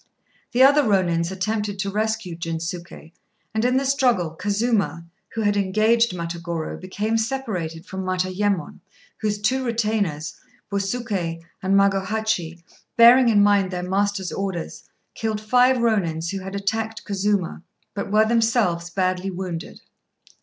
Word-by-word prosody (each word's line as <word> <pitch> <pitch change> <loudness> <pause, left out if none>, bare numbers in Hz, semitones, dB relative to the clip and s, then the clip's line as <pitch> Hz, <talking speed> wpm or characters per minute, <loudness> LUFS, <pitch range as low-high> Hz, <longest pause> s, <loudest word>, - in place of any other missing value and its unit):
The 250 +2 +5
other 285 +2 +7
Rônins 180 -7 +1
attempted 205 +2 -2
to 195 +1 -2
rescue 215 -3 -2
Jinsuké, 165 0 -6 0.4
and, 220 0 0
in 250 +1 +3
the 275 - 0
struggle, 250 - +2
Kazuma, 200 0 -1 0.3
who 225 - -1
had 205 -1 +2
engaged 215 +3 +2
Matagorô, 170 -1 -4
became 210 +4 -1
separated 210 -10 -3
from 190 -2 -5
Matayémon, 185 -1 -1 0.4
whose 210 -1 -1
two 260 +5 +1
retainers, 215 -10 -1 0.4
Busuké 195 -5 -2 0.2
and 190 +1 +1
Magohachi, 195 -3 0 0.3
bearing 240 +1 +8
in 205 -2 +5
mind 200 -2 +3
their 180 -1 -4
master's 195 -1 0
orders, 190 -4 -5 0.2
killed 220 -1 -2
five 250 +4 +4
Rônins 180 -8 0
who 195 - -3
had 190 +1 -7
attacked 220 +2 -2
Kazuma, 200 -3 -1 0.3
but 200 0 -4
were 215 +1 +5
themselves 220 -7 +1
badly 185 +1 -1
wounded. 180 -3 -6
200 Hz, 130 wpm, -23 LUFS, 180-220 Hz, 0.4 s, bearing